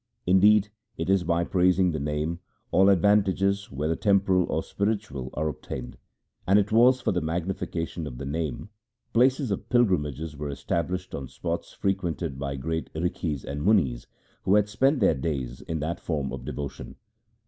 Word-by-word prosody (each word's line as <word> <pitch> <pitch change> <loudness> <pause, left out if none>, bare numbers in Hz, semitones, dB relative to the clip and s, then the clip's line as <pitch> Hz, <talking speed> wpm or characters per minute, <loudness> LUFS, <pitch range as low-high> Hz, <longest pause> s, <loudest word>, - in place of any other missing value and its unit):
Indeed, 100 +3 +5 0.3
it - - 0
is 95 -2 +3
by 85 0 +1
praising 90 0 +3
the 75 - -3
Name 75 +4 -2 0.3
all 95 +1 +5
advantages, 100 +1 +2
whether 75 +4 -1
temporal 95 -3 +3
or 80 - 0
spiritual, 100 - -2
are 75 +2 0
obtained; 65 -4 -6 0.5
and 95 +2 +5
it 105 0 +1
was 125 +3 +5
for - - +1
the 90 -2 0
magnification 85 -1 -3
of - - -8
the 70 - -6
Name 80 +6 -3 0.4
places 130 +1 +3
of 100 +2 -3
pilgrimages 80 - +1
were 75 0 -5
established 85 +6 -3
on 70 -2 -5
spots 85 +6 -4
frequented 85 -7 -2
by 70 0 -3
great 80 +4 -3
Rikhis 80 -3 -2
and 70 +2 -4
Munis 80 - +2 0.3
who 95 - +3
had 105 -1 +4
spent 130 +6 +2
their 95 - +5
days 65 -4 -3
in 80 -2 -4
that 80 +3 -2
form 75 -5 -2
of - - -7
devotion. 70 -1 -6
85 Hz, 160 wpm, -26 LUFS, 75-100 Hz, 0.5 s, Indeed